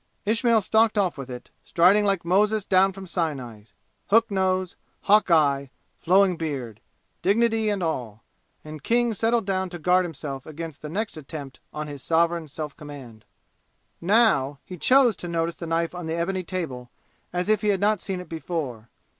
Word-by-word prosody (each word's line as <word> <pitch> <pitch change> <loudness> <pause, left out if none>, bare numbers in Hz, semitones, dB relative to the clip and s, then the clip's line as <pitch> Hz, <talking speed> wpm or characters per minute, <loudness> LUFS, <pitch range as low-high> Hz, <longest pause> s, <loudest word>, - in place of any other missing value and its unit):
Ismail 230 +1 +3
stalked 220 +2 +2
off 190 -4 +1
with 135 -2 -8
it, 125 -1 -9
striding 195 +5 +4
like 195 -4 0
Moses 210 +3 +2
down 190 0 +4
from 195 0 -9
Sinai 135 - -4 0.4
hook 225 +2 +3
nose 185 -1 0 0.3
hawk 210 0 +4
eye 140 -4 +3 0.3
flowing 185 0 +3
beard 130 -9 -5 0.4
dignity 220 +2 +2
and 200 -3 -1
all, 120 -10 -3 0.4
and 155 -1 -8
King 235 +5 +1
settled 225 +1 +1
down 190 -1 -1
to 175 - -7
guard 180 +3 +3
himself 140 -5 -6
against 155 -1 -7
the 150 - -6
next 205 +2 -3
attempt 145 -2 -8
on 150 0 -5
his 145 -2 -8
sovereign 165 +1 +1
self 150 0 -6
command. 135 -7 -11 0.8
Now 170 - +3
he 185 - -8
chose 255 - +4
to 175 - -7
notice 170 0 -2
the 170 - -6
knife 165 +1 0
on 175 -2 -6
the 160 - -2
ebony 185 +3 -1
table 150 -9 -5 0.4
as 180 +1 -2
if 215 -1 +2
he 210 - -1
had 200 -2 +2
not 210 0 +2
seen 190 -2 -4
it 180 - -9
before. 155 -9 -5
175 Hz, 170 wpm, -25 LUFS, 150-200 Hz, 0.8 s, striding